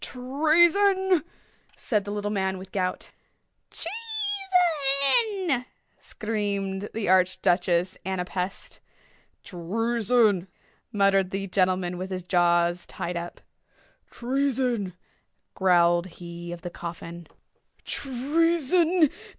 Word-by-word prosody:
"Treason!" 345 +7 +3 0.5
said 210 -4 0
the 205 - -5
little 205 0 -3
man 190 -2 -1
with 190 0 -10
the - - -7
gout. 185 0 -3 0.6
"Treason!" 375 - +1 0.3
screamed 205 -2 -3
the 220 -2 -2
Arch 185 0 +3
Duchess 175 0 +1
Ana 190 -1 -2
Pest. 180 +1 -5 0.6
"Treason!" 215 +2 +1 0.4
muttered 195 -3 +2
the 195 +1 -3
gentleman 185 -2 0
with 185 +1 -5
his 185 -1 -4
jaws 175 -1 +2
tied 175 +1 -4
up. 170 0 -6 0.7
"Treason!" 250 -6 -1 0.6
growled 175 -1 +3
he 170 -1 -9
of 175 -1 -8
the 175 - -5
coffin. 170 0 -8 0.6
"Treason! 325 +5 +2
205 Hz, 95 wpm, -26 LUFS, 180-280 Hz, 0.7 s, Treason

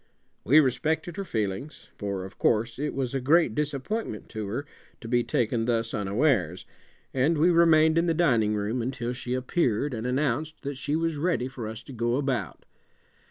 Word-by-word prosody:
We 145 +7 +6
respected 155 +5 0
her 200 - -2
feelings, 110 - -4
for, 100 -2 -4
of 95 - -12
course, 115 +2 +1
it 150 +1 -2
was 130 -2 -2
a 135 - -1
great 155 0 +4
disappointment 145 - -3
to 110 -2 -5
her 120 +8 -3 0.3
to 115 - -9
be 120 +1 +2
taken 115 -1 0
thus 115 -1 0
unawares, 100 - +1 0.5
and 140 +5 +2
we 170 +4 +4
remained 160 -1 +5
in 170 - +1
the 165 - +2
dining 120 -11 +3
room 105 +4 -1
until 120 0 -3
she 125 0 -3
appeared 130 -1 0
and 115 +1 -3
announced 145 +4 -1
that 140 -1 -5
she 145 +1 -1
was 165 -1 0
ready 150 -5 0
for 125 -4 -6
us 110 +1 -7
to 135 - -11
go 120 0 0
about. 135 -2 -2
130 Hz, 180 wpm, -27 LUFS, 115-155 Hz, 0.5 s, We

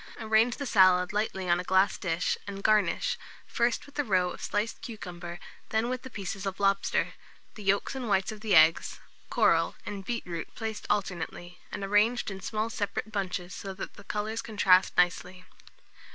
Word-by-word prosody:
Arrange 220 +2 +3
the 280 - -4
salad 185 -4 +5
lightly 205 -3 -1
on 175 0 +3
a - - -3
glass 190 +2 +3
dish, 175 -1 -1
and 200 0 -6
garnish, 210 -6 +2 0.3
first 235 +3 0
with 285 0 -11
a - - +3
row 185 -6 +2
of - - -9
sliced 210 +2 -2
cucumber, 175 -9 -7 0.3
then 220 +2 +1
with 255 0 -2
the 260 - -9
pieces 200 -3 -5
of 195 0 -4
lobster, 195 0 +1 0.4
the 215 - -11
yolks 200 +4 +1
and 255 -4 -4
whites 195 +1 +2
of 215 -1 -9
the 215 -4 +2
eggs, 160 +1 +5 0.3
coral, - - +3
and 200 -1 -5
beetroot 180 -7 -5
placed 220 -2 -5
alternately, 180 -3 -3
and 205 - -5
arranged 210 +3 +2
in 195 0 -7
small 215 +2 -2
separate 215 -1 -3
bunches, 185 -3 -3
so 195 -1 -6
that 195 - -6
the 200 - -14
colours 215 +2 -3
contrast 190 -4 +3
nicely. 180 +1 +1
200 Hz, 175 wpm, -29 LUFS, 185-220 Hz, 0.4 s, salad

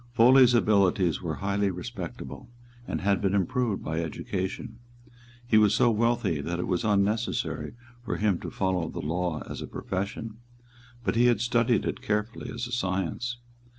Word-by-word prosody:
Foley's 125 +1 +7
abilities 100 -6 +3
were 80 -4 -3
highly 100 0 +1
respectable, 115 +6 -7 0.4
and - - -3
had 100 +1 +2
been 100 -1 +1
improved 120 +1 0
by 80 +1 -2
education. 95 +6 -4 0.7
He 110 -2 +5
was 105 -1 +4
so 120 - +4
wealthy 115 -8 +1
that 85 +4 -3
it - - -1
was 90 -2 -1
unnecessary 105 -5 0 0.3
for 120 - -2
him 105 -4 +1
to - - -6
follow 90 -4 -1
the - - -8
law 85 +1 -2
as - - -6
a - - -5
profession; 105 +3 -4 0.7
but - - 0
he 120 +1 +5
had 120 -4 +3
studied 120 -1 +2
it - - -3
carefully 105 +3 -2
as 115 +1 -4
a 120 - -8
science. 110 +2 -2
105 Hz, 160 wpm, -27 LUFS, 90-120 Hz, 0.7 s, Foley's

